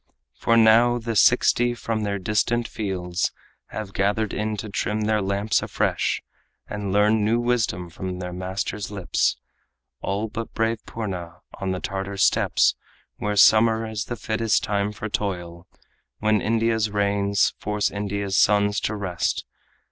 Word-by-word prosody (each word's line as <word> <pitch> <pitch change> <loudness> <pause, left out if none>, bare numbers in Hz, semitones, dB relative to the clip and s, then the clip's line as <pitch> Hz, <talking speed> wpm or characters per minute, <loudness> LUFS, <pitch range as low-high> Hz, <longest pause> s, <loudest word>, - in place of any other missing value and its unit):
For 115 - +2
now 115 +2 +6
the 115 -1 -4
sixty 120 +2 +4
from 115 -2 -3
their 100 -1 -1
distant 105 +4 0
fields 90 -4 -2 0.4
Have 105 -3 -6
gathered 105 +2 0
in 105 0 -2
to 110 - -5
trim 105 +1 -2
their 105 0 +1
lamps 100 +2 0
afresh - - -1 0.4
And 105 -2 -4
learn 105 +2 +3
new 115 +3 +2
wisdom 120 -8 0
from 90 +2 -6
the 90 -1 -5
master's 95 +2 -4
lips 100 -4 0 0.6
All 100 +3 -2
but 115 +1 -6
brave 115 0 0
Purna 90 -6 -6
on 95 - -4
the 95 0 -1
Tartar 95 +1 -4
steppes 95 - +3 0.4
Where 105 0 -2
summer 110 +2 +5
is 110 -1 -4
the 120 - -4
fittest 110 0 0
time 100 0 0
for 105 +1 -6
toil, 90 -4 -4 0.5
When 110 -1 +2
India's 110 -1 +1
rains 100 0 +1
force 105 0 -1
India's 100 -1 -1
sons 105 0 +3
to 110 - -2
rest. 95 -4 -2
105 Hz, 145 wpm, -24 LUFS, 95-110 Hz, 0.6 s, now